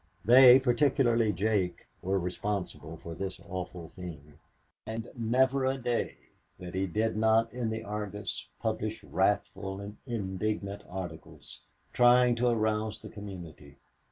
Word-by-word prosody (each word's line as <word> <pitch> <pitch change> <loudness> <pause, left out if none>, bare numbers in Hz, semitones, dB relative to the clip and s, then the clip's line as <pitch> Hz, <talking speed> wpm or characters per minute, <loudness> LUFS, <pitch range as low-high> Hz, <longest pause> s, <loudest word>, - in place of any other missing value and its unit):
They, 125 +2 +9
particularly 120 -3 +3
Jake, 100 -1 0 0.2
were 95 +2 0
responsible 90 -3 -4
for 85 +1 -8
this 95 +3 -5
awful 90 -3 -6
thing. 75 -4 -10 0.4
And 115 +1 -6
never 130 +3 +2
a 130 +1 +1
day 120 -2 -2 0.4
that 90 -1 -8
he 95 +1 0
did 110 +5 0
not 110 +1 +3
in 120 -2 -2
the 110 0 -3
Argus 105 -1 -5
publish 110 -1 -2
wrathful 95 0 0
and 100 +1 -8
indignant 100 -2 -3
articles, 90 -4 -8 0.3
trying 125 0 +6
to 125 +1 +2
arouse 110 -1 0
the - - -8
community. 85 -9 -10
105 Hz, 130 wpm, -30 LUFS, 95-115 Hz, 0.4 s, They